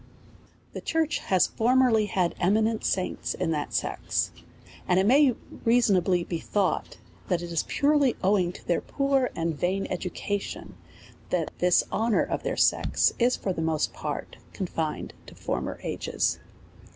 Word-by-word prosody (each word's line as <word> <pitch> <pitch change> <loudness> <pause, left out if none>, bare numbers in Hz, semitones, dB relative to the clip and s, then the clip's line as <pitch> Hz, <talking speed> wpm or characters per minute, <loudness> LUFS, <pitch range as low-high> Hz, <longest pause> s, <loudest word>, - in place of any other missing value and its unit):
The - - -6
church 325 -1 0
has 185 -2 +2
formerly 235 -2 +3
had 185 -3 0
eminent 215 +4 +2
saints 185 -1 -1
in 165 - -1
that 150 -2 -2
sex; - - -1 0.6
and 180 0 +3
it 190 - +2
may 265 +2 +5 0.3
reasonably 195 -7 +3
be 170 -1 -4
thought, 200 +1 -1 0.3
that 175 -2 0
it 170 - -6
is 165 - +1
purely 285 -3 +2
owing 185 -2 +3
to - - -14
their 175 - +1
poor 275 -2 +1
and 165 -1 -1
vain 185 +6 -1
education, 195 +2 -4 0.5
that 170 -3 -1
this 180 0 +4
honour 225 0 +2
of - - -3
tlieir - - -3
sex - - +3
is, 245 +1 +3
for 190 - -2
the 165 - -4
most 160 -1 0
part, - - -5 0.2
confined 165 -5 -3
to - - -12
former - - -3
ages. - - -1
195 Hz, 150 wpm, -27 LUFS, 175-235 Hz, 0.6 s, may